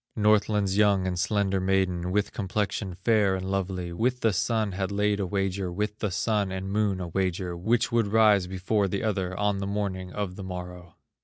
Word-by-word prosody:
Northland's 105 -2 +2
young 100 -3 +4
and 90 -1 -2
slender 95 0 +1
maiden, 95 -2 0
With 105 +1 0
complexion 100 -1 -2
fair 100 0 +2
and 95 0 -4
lovely, 95 -2 -2
With 125 +7 0
the 110 -2 +2
Sun 110 +2 0
had 95 +1 -3
laid 105 0 +1
a 95 - -1
wager, 95 -1 -1
With 105 +3 -3
the 105 - -1
Sun 100 +1 0
and 95 +1 -4
Moon 100 -2 +1
a 90 -2 -4
wager, 90 0 -1
Which 110 +7 +1
should 115 -3 +2
rise 105 -3 +4
before 95 +2 0
the 100 +1 -2
other, 95 -4 -1
On 105 -1 +1
the 100 - -3
morning 100 -3 -3
of 100 -2 -4
the 100 - -6
morrow. 90 -2 -8
95 Hz, 190 wpm, -27 LUFS, 95-105 Hz, -, young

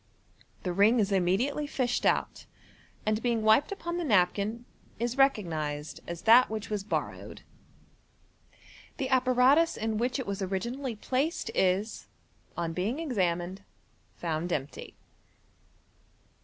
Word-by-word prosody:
The 180 - -2
ring 210 +6 +4
is 205 -1 +1
immediately 200 +11 +1
fished 250 -3 0
out, - - -1 0.6
aixl 215 +1 0
being 235 -2 0
wiped 220 - +4
upon 345 -3 -4
the 350 - -2
napkin, 210 - +1 0.3
is 240 +1 -2
recognized 160 - 0
as 170 -1 -6
that 235 +3 +7
which 215 0 -5
was 205 -2 -2
borrowed. 210 - -4 1.5
The 265 - -2
apparatus 260 +5 +4
in 220 -1 -2
which 245 +1 0
it 260 - -4
was 200 0 -4
originally 235 +7 -3
placed 265 +9 -2
is, 190 +4 0 0.5
on 170 -1 -2
being 200 - -2
examined, 185 - -1 0.5
found 170 +1 -3
empty. 140 -3 -4
220 Hz, 120 wpm, -29 LUFS, 185-255 Hz, 1.5 s, that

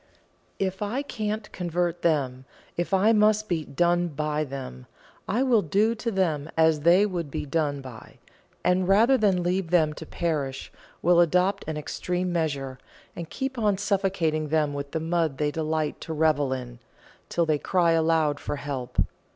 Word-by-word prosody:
If 190 0 -2
I 230 +7 -1
can't 215 -5 -4
convert 175 -1 -2
them, 135 -6 0 0.3
if 175 +2 -2
I 200 +4 +4
must 215 0 +3
be 165 -5 -1
'done' 175 +3 +1
by 150 -1 -2
them, 130 - -7 0.4
I 235 +7 +1
will 245 -5 +4
'do' 205 +7 +2
to 230 +1 -3
them 165 -8 0
as 160 -2 +4
I 180 +4 +6
would 175 -6 -3
be 140 - -4
'done' 145 -1 -1
by; 125 -4 -11 0.5
and 180 0 +2
rather 225 +7 +5
than 195 -7 +2
leave 180 0 0
them 160 -3 +3
to 155 +1 -9
perish, 145 -6 -3 0.3
will 175 0 +5
adopt 180 +4 +2
an 155 -1 -3
extreme 180 +4 -2
measure, 140 -6 -2 0.4
and 170 -2 -6
keep 265 -2 -4
on 205 -3 +2
suffocating 190 -6 0
them 150 -1 +1
with 140 0 -5
the 160 - -2
mud 165 -3 0
they 150 0 0
delight 155 -1 -2
to 160 - -5
revel 150 -3 +2
in, 125 -2 -5 0.5
till 170 - +1
they 155 -2 +1
cry 175 0 +2
aloud 160 -3 +2
for 145 - -4
help. 140 -3 -5
165 Hz, 165 wpm, -26 LUFS, 150-190 Hz, 0.5 s, I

